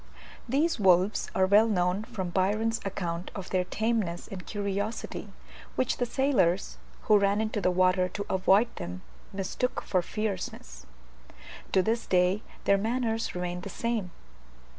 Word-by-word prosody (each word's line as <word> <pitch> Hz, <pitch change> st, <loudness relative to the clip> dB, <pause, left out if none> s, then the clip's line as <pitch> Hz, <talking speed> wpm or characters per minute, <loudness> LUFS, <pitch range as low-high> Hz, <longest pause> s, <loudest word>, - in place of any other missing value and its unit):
These 290 Hz, +3 st, +1 dB
wolves 190 Hz, +1 st, +3 dB
are 190 Hz, -, +4 dB
well 205 Hz, +4 st, +5 dB
known 185 Hz, 0 st, +1 dB
from 185 Hz, -5 st, -4 dB
Byron's 215 Hz, +5 st, +1 dB
account 175 Hz, -3 st, -3 dB
of 195 Hz, -3 st, -7 dB
their 185 Hz, -1 st, +2 dB
tameness 210 Hz, -3 st, -1 dB
and 185 Hz, -2 st, -7 dB
curiosity, 205 Hz, +1 st, -3 dB, 0.4 s
which 255 Hz, -, 0 dB
the 245 Hz, -, 0 dB
sailors, 225 Hz, -9 st, +1 dB, 0.2 s
who 210 Hz, -1 st, +5 dB
ran 200 Hz, +1 st, +2 dB
into 215 Hz, -1 st, -1 dB
the 180 Hz, -, +3 dB
water 185 Hz, 0 st, +3 dB
to 205 Hz, +3 st, -4 dB
avoid 195 Hz, +5 st, +3 dB
them, 90 Hz, +1 st, -6 dB, 0.3 s
mistook 200 Hz, +6 st, -2 dB
for 185 Hz, -, +1 dB
fierceness. 185 Hz, -, -5 dB, 0.9 s
To 190 Hz, -, +4 dB
this 230 Hz, +4 st, -1 dB
day 180 Hz, +2 st, +3 dB, 0.2 s
their 200 Hz, 0 st, +4 dB
manners 225 Hz, 0 st, -1 dB
remain 180 Hz, 0 st, -3 dB
the 200 Hz, -, -7 dB
same. 225 Hz, -2 st, -2 dB
195 Hz, 140 wpm, -28 LUFS, 180-220 Hz, 0.9 s, well